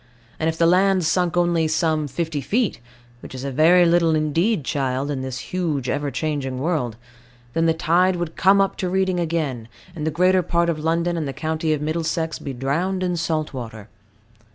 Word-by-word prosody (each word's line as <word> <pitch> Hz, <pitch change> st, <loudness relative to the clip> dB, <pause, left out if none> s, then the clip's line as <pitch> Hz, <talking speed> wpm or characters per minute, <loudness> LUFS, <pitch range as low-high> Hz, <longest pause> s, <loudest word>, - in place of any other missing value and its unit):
And 160 Hz, -, +1 dB
if 160 Hz, -, -4 dB
the 165 Hz, -, +3 dB
land 185 Hz, +1 st, +3 dB
sunk 175 Hz, +1 st, +1 dB
only 170 Hz, -2 st, +2 dB
some 155 Hz, -1 st, 0 dB
fifty 155 Hz, +1 st, -3 dB
feet, 225 Hz, -, 0 dB, 0.4 s
which -, -, -10 dB
is 130 Hz, -, -6 dB
a 140 Hz, -, -3 dB
very 170 Hz, +6 st, +5 dB
little 170 Hz, -1 st, +3 dB
indeed, 155 Hz, -, +1 dB
child, 135 Hz, 0 st, -1 dB
in 135 Hz, -2 st, -3 dB
this 130 Hz, -1 st, -5 dB, 0.2 s
huge, 155 Hz, -8 st, -1 dB
ever 145 Hz, 0 st, -1 dB
changing 135 Hz, -1 st, -3 dB
world, 135 Hz, -6 st, -1 dB, 0.6 s
then 165 Hz, 0 st, +2 dB
the 165 Hz, -, +4 dB
tide 175 Hz, +4 st, +2 dB
would 175 Hz, -2 st, -4 dB
come 195 Hz, +2 st, +4 dB
up 195 Hz, 0 st, +1 dB
to 185 Hz, -, -2 dB
Reading 190 Hz, -1 st, +1 dB
again, 155 Hz, -9 st, -2 dB, 0.3 s
and 155 Hz, -, -5 dB
the 160 Hz, -, +1 dB
greater 185 Hz, +3 st, +3 dB
part 170 Hz, -1 st, 0 dB
of 155 Hz, -, -5 dB
London 170 Hz, +2 st, 0 dB
and 155 Hz, -3 st, -2 dB
the 135 Hz, -, -4 dB
county 160 Hz, +1 st, -2 dB
of 150 Hz, -1 st, -1 dB
Middlesex 160 Hz, +1 st, -2 dB
be 140 Hz, -, -5 dB
drowned 165 Hz, +9 st, -1 dB
in 180 Hz, -1 st, 0 dB
salt 160 Hz, -2 st, -2 dB
water. 115 Hz, -4 st, -8 dB
160 Hz, 195 wpm, -22 LUFS, 145-175 Hz, 0.6 s, very